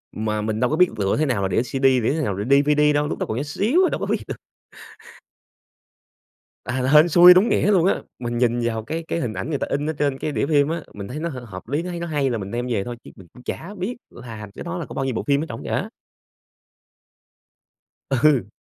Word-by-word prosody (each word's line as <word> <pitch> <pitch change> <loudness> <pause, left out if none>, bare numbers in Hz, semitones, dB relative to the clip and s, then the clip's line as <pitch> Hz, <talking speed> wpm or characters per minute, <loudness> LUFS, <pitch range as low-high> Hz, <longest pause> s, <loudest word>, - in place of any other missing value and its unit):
Mà 110 0 -2
mình 110 0 -2
đâu 125 - +2
có 155 - 0
biết 180 +1 +4
lựa 100 +3 0
thế 155 - +2
nào 120 -8 0
là 95 - +1
đĩa 95 - +1
CD, 130 +2 -5
đĩa 135 +3 +3
nào 100 - -1
là 100 +2 -4
DVD 145 +2 +4
đâu, 145 0 +1
lúc - - -4
đó - - -1
còn 110 - -2
nhỏ 140 - -1
xíu 230 - +2
à - - +2
đâu - - -2
có - - -2
biết - - 0
được. - - -4 2.3
À, 130 0 -2
hên 155 +3 +7
xui 175 +2 +9
đúng 195 +6 +4
nghĩa 205 - +2
luôn 180 -2 +4
á, - - +1 0.2
mình 120 -1 -3
nhìn 120 -1 +1
vào 110 -2 -2
cái 165 +6 -4
cái 170 - -1
hình 120 -4 -2
ảnh 130 - -5
người 145 - -1
ta - - -2
in 145 +2 -1
ở - - -1
trên 140 -2 -1
cái 150 - -3
đĩa - - 0
phim 145 -2 +3
á, 165 -1 -3
mình 100 -1 -7
thấy 145 - -6
nó 170 +2 -2
h 130 -5 -7
hợp 95 0 -10
lý, 145 +5 -1
nó 180 - -5
thấy 170 -1 -5
nó 170 - -3
hay 145 -4 0
là 115 - -1
mình 100 0 -6
đem 120 +1 -3
về 105 -5 -1
thôi 120 -1 -6
chứ - - -11
mình 95 - -14
cũng 125 - -15
chả 190 +10 -6
biết 205 +7 -3
làm 110 -4 -9
cái - - -8
đó 175 +1 -4
là 165 - -5
có - - -10
bao 135 - -2
nhiêu 130 -3 -2
bộ - - -2
phim 140 +1 +2
ở - - -4
trỏng 115 - -7
vậy - - -5
á. - - -2 2.2
Ừ. 135 -6 +3
135 Hz, 265 wpm, -22 LUFS, 115-160 Hz, 2.3 s, xui